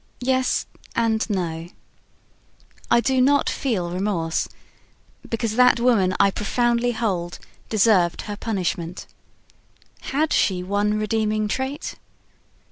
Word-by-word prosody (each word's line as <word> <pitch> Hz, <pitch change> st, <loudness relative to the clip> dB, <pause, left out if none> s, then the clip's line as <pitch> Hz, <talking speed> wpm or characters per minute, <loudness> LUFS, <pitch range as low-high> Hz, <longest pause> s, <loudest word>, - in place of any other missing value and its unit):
Yes 260 Hz, 0 st, +1 dB, 0.3 s
and 225 Hz, -1 st, +1 dB
no. 170 Hz, -4 st, -3 dB, 1.2 s
I 235 Hz, -, +5 dB
do 260 Hz, +1 st, +2 dB
not 285 Hz, +2 st, +3 dB
feel 190 Hz, -10 st, -2 dB
remorse, 180 Hz, -3 st, -1 dB, 0.8 s
because 230 Hz, -1 st, -2 dB
that 250 Hz, 0 st, +6 dB
woman, 215 Hz, -7 st, +3 dB
I 200 Hz, 0 st, +5 dB
profoundly 240 Hz, +4 st, +1 dB
hold, 185 Hz, -7 st, -2 dB, 0.3 s
deserved 200 Hz, -5 st, +3 dB
her 205 Hz, -, -5 dB
punishment. 180 Hz, -5 st, -3 dB, 0.9 s
Had 300 Hz, +3 st, -1 dB
she 180 Hz, -2 st, +2 dB
one 205 Hz, +2 st, 0 dB
redeeming 215 Hz, 0 st, 0 dB
trait? 265 Hz, +6 st, -3 dB
215 Hz, 105 wpm, -23 LUFS, 185-240 Hz, 1.2 s, that